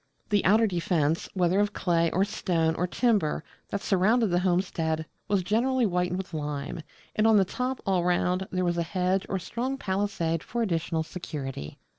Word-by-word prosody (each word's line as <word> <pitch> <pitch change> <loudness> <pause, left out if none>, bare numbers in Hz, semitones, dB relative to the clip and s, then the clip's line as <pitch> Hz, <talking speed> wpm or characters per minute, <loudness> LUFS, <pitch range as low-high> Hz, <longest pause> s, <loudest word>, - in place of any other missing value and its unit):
The 205 -2 +2
outer 215 +4 +5
defence, 170 -5 0
whether 180 +1 +2
of 205 0 +1
clay, 170 -2 +2
or 190 +4 +2
stone, 170 -6 0
or 180 +2 -1
timber, 200 -8 +1 0.3
that 200 - -3
surrounded 215 +3 +3
the 175 - +3
homestead 175 -3 0 0.2
was 200 -3 +1
generally 240 +6 +2
whitened 180 -2 0
with 190 -2 -6
lime; 150 +1 -4 0.3
and 215 +1 +3
on 220 -1 +6
the 195 - +4
top 250 +6 -3
all 190 -3 +2
round, 180 +1 +1
there 185 0 0
was 175 -1 0
a - - +2
hedge 185 +3 0
or 195 - 0
strong 245 +8 -3
palisade 190 -6 -1
for 235 +6 -2
additional 165 -4 -1
security. 135 - -6
180 Hz, 175 wpm, -27 LUFS, 170-205 Hz, 0.3 s, on